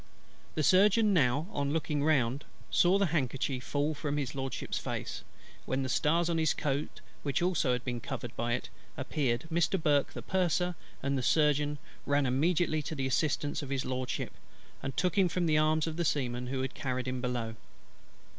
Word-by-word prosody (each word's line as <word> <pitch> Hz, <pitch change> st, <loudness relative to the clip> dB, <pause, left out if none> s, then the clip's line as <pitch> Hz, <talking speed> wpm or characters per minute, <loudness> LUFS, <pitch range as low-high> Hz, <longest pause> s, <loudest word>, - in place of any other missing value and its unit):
The 155 Hz, -, +1 dB
Surgeon 205 Hz, +5 st, +5 dB
now, 145 Hz, -2 st, +3 dB
on 140 Hz, -1 st, -1 dB
looking 150 Hz, -2 st, 0 dB
round, 140 Hz, -3 st, +2 dB, 0.3 s
saw 180 Hz, +2 st, +5 dB
the 200 Hz, -, +3 dB
handkerchief 135 Hz, -3 st, -1 dB
fall 145 Hz, +4 st, 0 dB
from 145 Hz, -1 st, -2 dB
His 140 Hz, -4 st, -2 dB
LORDSHIP's 135 Hz, -1 st, -3 dB
face; -, -, -4 dB, 0.4 s
when 135 Hz, +1 st, 0 dB
the 130 Hz, -, -3 dB
stars 165 Hz, +6 st, +2 dB
on 170 Hz, -1 st, +1 dB
his 160 Hz, -2 st, +2 dB
coat, 145 Hz, 0 st, -2 dB, 0.2 s
which 140 Hz, +3 st, 0 dB
also 170 Hz, -8 st, +2 dB
had 125 Hz, 0 st, -3 dB
been 120 Hz, -2 st, -2 dB
covered 120 Hz, -2 st, -6 dB
by 120 Hz, +1 st, -1 dB
it, -, -, -3 dB, 0.3 s
appeared. 125 Hz, -4 st, -1 dB
Mr. 170 Hz, +3 st, +2 dB
BURKE 145 Hz, -3 st, +2 dB
the -, -, -6 dB
Purser, 180 Hz, -1 st, +1 dB, 0.3 s
and 140 Hz, 0 st, +1 dB
the -, -, -1 dB
Surgeon, 150 Hz, +1 st, +2 dB, 0.3 s
ran 145 Hz, 0 st, +3 dB
immediately 155 Hz, +4 st, +2 dB
to 155 Hz, +2 st, -5 dB
the 135 Hz, -2 st, -2 dB
assistance 145 Hz, +2 st, 0 dB
of 140 Hz, -, -7 dB
His 135 Hz, -1 st, -1 dB
LORDSHIP, 130 Hz, -1 st, -3 dB, 0.5 s
and 135 Hz, -, -5 dB
took 180 Hz, +2 st, +2 dB
him 185 Hz, -2 st, +4 dB
from 175 Hz, +1 st, 0 dB
the 155 Hz, -2 st, +3 dB
arms 155 Hz, 0 st, +3 dB
of 160 Hz, -1 st, -4 dB
the 170 Hz, -, +1 dB
Seamen 125 Hz, -5 st, -1 dB
who 130 Hz, 0 st, -2 dB
had 130 Hz, -, -3 dB
carried 130 Hz, -1 st, -3 dB
him 130 Hz, 0 st, -2 dB
below. 120 Hz, -3 st, -2 dB
145 Hz, 185 wpm, -31 LUFS, 130-160 Hz, 0.5 s, Surgeon